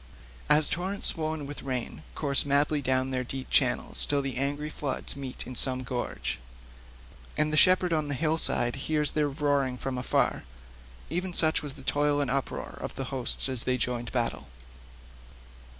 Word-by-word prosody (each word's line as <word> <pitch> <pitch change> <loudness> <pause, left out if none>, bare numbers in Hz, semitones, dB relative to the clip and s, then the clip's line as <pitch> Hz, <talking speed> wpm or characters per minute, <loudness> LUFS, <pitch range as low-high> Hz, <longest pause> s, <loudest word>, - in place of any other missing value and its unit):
As 150 0 +7
torrents 190 +4 0
swollen 155 -2 -3
with 145 +1 -7
rain 130 -3 -4
course 140 -3 +1
madly 145 +1 +2
down 130 0 0
their 130 -1 -1
deep 130 +1 -7
channels 125 -2 +4
till 145 -1 +1
the 135 -1 -4
angry 145 +3 -2
floods 140 -2 -2
meet 135 -2 -6
in 130 - -7
some 130 +1 +3
gorge, 125 0 -4 1.0
and 155 0 +2
the - - +4
shepherd 185 +1 +5
on 155 -2 0
the 145 - -2
hillside 155 -5 +1
hears 150 -1 +3
their 150 -1 +1
roaring 140 -3 0
from 130 0 -4
afar—even 65 - -3
such 160 -1 +3
was 145 -2 -5
the 135 -2 -12
toil 145 +1 +1
and 140 -3 0
uproar 135 0 -3
of - - -6
the 135 - -3
hosts 130 0 +1
as 130 -3 -3
they 130 0 +1
joined 120 0 -2
in - - -7
battle. 115 - -2
140 Hz, 165 wpm, -28 LUFS, 125-150 Hz, 1.0 s, As